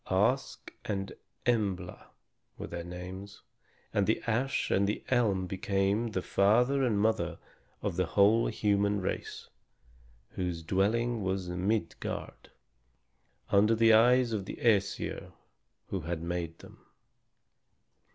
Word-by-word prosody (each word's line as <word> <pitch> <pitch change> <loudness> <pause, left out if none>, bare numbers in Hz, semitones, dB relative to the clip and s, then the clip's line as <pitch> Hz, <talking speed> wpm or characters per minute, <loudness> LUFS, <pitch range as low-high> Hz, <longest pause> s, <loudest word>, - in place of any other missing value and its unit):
Ask 115 +8 0
and 95 -2 -3 0.3
Embla 100 -7 -1 0.5
were - - -5
their 85 0 -6
names, 90 +3 -8 0.5
and 100 -1 +2
the 110 - +2
ash 120 +4 0
and 100 +1 +3
the 105 - -2
elm 105 -7 +2
became 100 +4 0
the 95 - -1
father 125 +8 +3
and 110 -5 +1
mother 110 +1 +1 0.5
of 85 - -2
the 90 -2 +1
whole 105 +5 +4
human 100 -1 +1
race 90 - -4 0.8
whose 90 -3 -4
dwelling 110 +7 +1
was 95 -1 -2
Midgard, 90 +1 -3 1.0
under 105 +3 +5
the 115 0 +5
eyes 120 +1 +5
of 100 -3 -2
the - - -6
Æsir 100 -4 0 0.6
who 95 - -2
had 85 0 -4
made 85 -1 -3
them. - - -16
100 Hz, 120 wpm, -30 LUFS, 95-115 Hz, 1.0 s, under